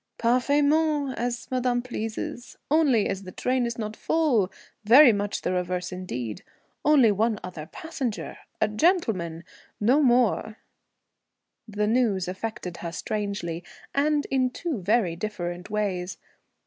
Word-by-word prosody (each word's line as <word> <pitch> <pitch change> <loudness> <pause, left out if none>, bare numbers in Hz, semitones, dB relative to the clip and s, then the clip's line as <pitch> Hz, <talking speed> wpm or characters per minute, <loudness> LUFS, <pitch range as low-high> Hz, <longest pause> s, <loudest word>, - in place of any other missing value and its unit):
"Parfaitement, 285 +4 +2
as 240 0 -3
madame 250 -1 +1
pleases. 235 0 -5
Only, 285 -9 +4
as 195 -1 -3
the 185 -1 -9
train 250 +4 0
is 235 - -4
not 215 -1 -4
full 250 - +1 0.3
very 245 +4 +8
much 205 0 -2
the - - 0
reverse 180 0 -2
indeed 125 - -5 0.4
only 280 -7 +6
one 215 +2 +1
other 175 -4 -7
passenger, 270 -9 -5 0.2
a 215 - +3
gentleman 210 - +1 0.4
no 250 +8 +4
more 240 -4 +2 0.6
" - - -57
The 210 - +2
news 215 -5 +1
affected 185 -1 -5
her 170 - -5
strangely, 200 -3 -3 0.3
and 295 +1 +2
in 260 -1 +2
two 290 - -4
very 195 -3 +2
different 175 -2 -5
ways. 195 -4 -2
220 Hz, 130 wpm, -26 LUFS, 185-255 Hz, 0.6 s, very